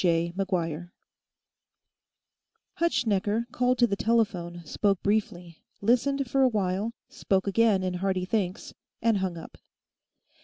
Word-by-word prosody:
Hutschnecker, 230 - +1
called 250 0 +1
to 240 - +5
the 200 -4 -1
telephone, 190 -6 0
spoke 195 +4 0
briefly, 180 -5 -1 0.2
listened 260 +5 +1
for 270 +3 +1
a 260 - +6
while, 205 +1 -1
spoke 190 -1 -1
again 205 -1 +3
in 185 -1 -1
hearty 185 0 -1
thanks, 190 -2 -2 0.3
and 225 -3 +3
hung 185 -3 -2
up. 165 - -11
205 Hz, 110 wpm, -27 LUFS, 185-230 Hz, 0.3 s, a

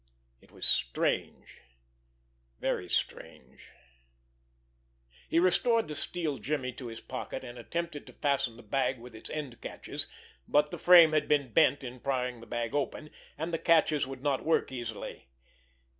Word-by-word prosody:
It - - -22
was - - -4
strange, - - 0 1.0
very 90 - -1
strange! 65 -5 -4 1.6
He - - +1
restored 220 +6 +3
the 150 - -5
steel 155 -2 -2
jimmy 130 -3 -2
to 125 0 -8
his 115 0 -7
pocket, 130 - -6
and 120 -1 -9
attempted 170 +3 -4
to - - -12
fasten 140 -5 0
the 120 - -13
bag 130 +4 0
with 120 0 -12
its 110 - -1
end 140 -6 -5
catches, - - -2 0.4
but 150 0 +3
the - - -6
frame 175 -3 +8
had 155 -1 +1
been 140 -6 +1
bent 140 - +4
in 125 0 -7
prying 125 -2 -2
the 115 - -13
bag 120 -1 -3
open, 145 +1 -2 0.3
and 165 +3 -4
the 165 - 0
catches 155 -4 +3
would 135 -1 -8
not 140 -3 0
work 160 -3 +1
easily. 115 - -6
135 Hz, 155 wpm, -30 LUFS, 120-155 Hz, 1.6 s, frame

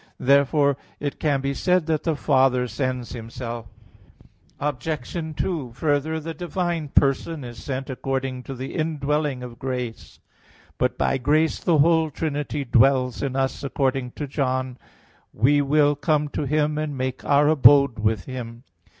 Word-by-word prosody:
Therefore 140 +1 +3 0.2
it 145 -1 -4
can 145 -3 +1
be 140 0 -1
said 180 +3 +1
that 155 -2 0
the 165 -2 +1
Father 130 -3 +2
sends 125 +1 -3
Himself. 115 0 -6 0.9
Obj. 145 -1 -3 0.2
2: 150 -10 -2
Further, 155 +1 0
the 165 +1 -6
divine 175 -3 -3
person 140 +3 +1
is 120 -1 -9
sent 135 -1 -4
according 130 -1 -3
to 135 - -6
the 130 +2 -6
indwelling 150 -4 -1
of 120 -1 -9
grace. 125 -3 -5 0.6
But - - 0
by 135 - +1
grace 155 +5 +2
the 170 -3 +2
whole 160 +1 +4
Trinity 145 -1 -3
dwells 125 0 +3
in 135 -2 -2
us 135 +1 -1
according 135 -2 -1
to 150 - -4
John 130 -2 -2 0.6
14:23: - - -17
"We 145 +3 +5
will 145 +1 +3
come 150 +1 0
to 145 - -3
him 150 +1 +1
and 150 -3 -3
make 130 0 -3
Our 145 +1 +4
abode 140 -5 +6
with 110 -2 0
him." 120 -2 -7
140 Hz, 150 wpm, -23 LUFS, 130-150 Hz, 0.9 s, abode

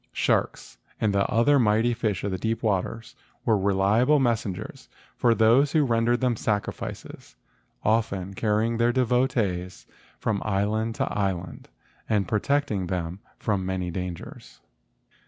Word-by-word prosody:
Sharks - - -1 0.2
and 105 -2 +1
other 115 +8 +3
mighty 115 +1 +3
fish 110 -5 -2
of 100 - -1
the 95 - -3
deep 115 +4 -2
waters 110 +2 -2 0.3
were 115 - +4
reliable 100 +8 +3
messengers 110 -7 -2 0.3
for 115 -1 +3
those 120 +6 +4
who 155 -2 +4
rendered 120 0 +1
them 125 -2 +2
sacrifices, 105 - -4 0.5
often 100 -4 0
carrying 110 +3 0
their 120 +1 +3
devotees 120 -8 0 0.3
from 105 -3 -1
island 110 +2 -1
to - - -2
island 95 -3 -3 0.4
and 105 -4 +1
protecting 105 -3 0
them 90 0 -3 0.2
from 100 -3 -1
many 90 -1 -2
dangers. 90 -1 -7
110 Hz, 125 wpm, -25 LUFS, 95-115 Hz, 0.5 s, were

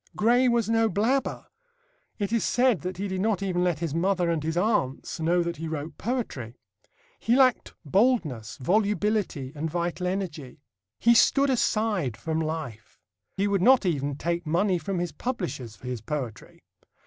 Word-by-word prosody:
Gray 245 +4 +3
was 235 -3 +2
no 225 0 +2
blabber. 230 +8 0 0.7
It 205 0 -2
is 230 - +2
said 245 - +2
that 185 +2 -5
he 200 +2 -2
did 190 -1 -3
not 205 -2 0
even 180 -2 0
let 175 -4 +1
his 165 -2 -3
mother 180 0 +1
and 165 -2 -1
his 160 +2 -2
aunts 180 - 0
know 170 +2 +2
that 170 0 -4
he 165 +2 -5
wrote 155 -1 -5
poetry. 195 - -3 0.6
He 235 - +2
lacked 255 -3 +3
boldness, 150 - +1
volubility 205 - 0
and 160 +1 -3
vital 175 +2 -2
energy. 160 -8 -5 0.3
He 235 - +5
stood 275 +3 +4
aside 215 - 0
from 160 0 -2
life. 155 -9 -5 0.4
He 200 +1 +1
would 200 -2 +1
not 255 +1 +5
even 145 -5 -1
take 170 +2 -2
money 180 +3 +2
from 185 +4 -3
his 175 -1 -2
publishers 175 - -4
for - - -15
his 125 -3 -4
poetry. 125 -4 -6
180 Hz, 165 wpm, -26 LUFS, 155-215 Hz, 0.7 s, He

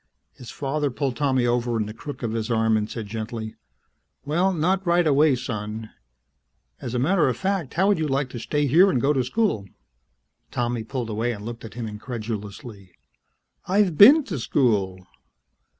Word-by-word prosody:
His 120 - -12
father 145 +1 -2
pulled 135 0 -2
Tommy 130 -4 +1
over 120 -1 0
in 110 - 0
the 105 - -7
crook 145 +4 -8
of 115 - -1
his 115 0 -3
arm 110 -1 +2
and 105 0 -1
said 115 -3 -5
gently, 110 +1 -5 0.7
"Well, 175 +6 +1
not 185 +3 0
right 175 -1 +2
away, 150 -1 +4
son. 110 -2 -5 0.9
As 125 0 -5
a - - +1
matter 150 +3 +2
of 120 - -2
fact, 190 -7 -2
how 190 +4 +3
would 205 - +2
you 155 - 0
like 135 -1 -1
to 120 - -6
stay 145 +6 -1
here 170 +9 +5
and 150 - +1
go 140 +4 +2
to 130 -3 +1
school?" 125 - -1 0.8
Tommy 120 -1 -2
pulled 120 -1 -4
away 115 +3 -1
and 105 -1 -9
looked 115 0 -7
at 110 - -10
him 120 -2 -4
incredulously. 105 -3 -7 0.7
"I've 190 -3 +2
been 280 - +8
to 170 - -5
school!" 100 -8 0
125 Hz, 180 wpm, -24 LUFS, 110-150 Hz, 0.9 s, been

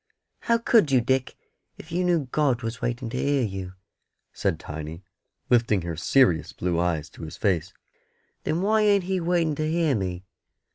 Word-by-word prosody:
"How 235 - +2
could 230 - +3
you, 130 - +5
Dick, 130 +2 0 0.4
if 160 - -12
you 180 +2 0
knew 170 -6 +1
God 135 -5 +1
was 115 +2 -4
waiting 120 +1 -2
to 130 - -2
hear 140 -2 +2
you?" 95 -4 -4 0.6
said 80 - -1
Tiny, 80 +3 -7 0.4
lifting 115 -6 +2
her 85 -1 -4
serious 85 - +2
blue 85 -1 -1
eyes 85 -4 0
to - - -13
his 80 -1 -7
face. 95 -3 0 0.7
"Then 160 +4 -1
why 215 +2 +3
ain't 205 -2 +4
He 190 +1 -1
waiting 170 -2 +1
to 155 +1 -2
hear 165 -3 +2
me?" 90 -5 -3
125 Hz, 175 wpm, -25 LUFS, -, 0.7 s, you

